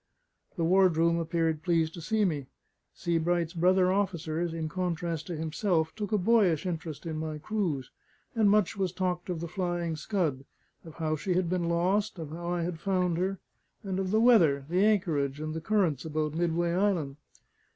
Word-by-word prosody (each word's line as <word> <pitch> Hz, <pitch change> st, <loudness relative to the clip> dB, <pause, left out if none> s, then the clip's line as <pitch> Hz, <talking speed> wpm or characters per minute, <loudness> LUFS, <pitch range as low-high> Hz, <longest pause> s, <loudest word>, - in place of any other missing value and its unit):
The 170 Hz, -, 0 dB
ward 185 Hz, 0 st, +4 dB
room 170 Hz, +1 st, +3 dB
appeared 165 Hz, -2 st, 0 dB
pleased 165 Hz, -2 st, +1 dB
to 170 Hz, -, -8 dB
see 215 Hz, +5 st, +1 dB
me; 145 Hz, -7 st, -2 dB, 0.5 s
Sebright's 170 Hz, 0 st, 0 dB
brother 185 Hz, +1 st, +3 dB
officers, 170 Hz, -4 st, -1 dB
in 160 Hz, -1 st, -3 dB
contrast 170 Hz, -2 st, -3 dB
to 175 Hz, -, -4 dB
himself, 160 Hz, +1 st, 0 dB
took 210 Hz, -1 st, -4 dB
a 210 Hz, -, +3 dB
boyish 195 Hz, -5 st, +3 dB
interest 165 Hz, -4 st, -4 dB
in 160 Hz, -2 st, -3 dB
my 155 Hz, -1 st, -4 dB
cruise; 155 Hz, -, -2 dB, 0.4 s
and 220 Hz, -3 st, +3 dB
much 210 Hz, -2 st, +3 dB
was 190 Hz, -3 st, -1 dB
talked 180 Hz, -1 st, -2 dB
of 170 Hz, -3 st, -3 dB
the 170 Hz, -, -3 dB
Flying 175 Hz, -2 st, -2 dB
Scud; 155 Hz, -6 st, -1 dB, 0.4 s
of 160 Hz, -2 st, -12 dB
how 155 Hz, -1 st, -1 dB
she 180 Hz, +4 st, -2 dB
had 180 Hz, -1 st, 0 dB
been 175 Hz, -2 st, 0 dB
lost, 190 Hz, +5 st, +1 dB
of 160 Hz, -3 st, -7 dB
how 170 Hz, +2 st, -6 dB
I 175 Hz, -1 st, -1 dB
had 170 Hz, -1 st, -4 dB
found 180 Hz, -2 st, 0 dB
her, 190 Hz, +2 st, -1 dB, 0.5 s
and 190 Hz, -2 st, -2 dB
of 190 Hz, -1 st, -1 dB
the 215 Hz, +3 st, +3 dB
weather, 170 Hz, -, +5 dB
the 180 Hz, +4 st, +2 dB
anchorage, 160 Hz, -10 st, +1 dB
and 155 Hz, 0 st, -4 dB
the 160 Hz, -, -4 dB
currents 175 Hz, -7 st, +1 dB
about 155 Hz, -1 st, -2 dB
Midway 170 Hz, +1 st, 0 dB
Island. 175 Hz, -7 st, 0 dB
170 Hz, 180 wpm, -29 LUFS, 160-190 Hz, 0.5 s, weather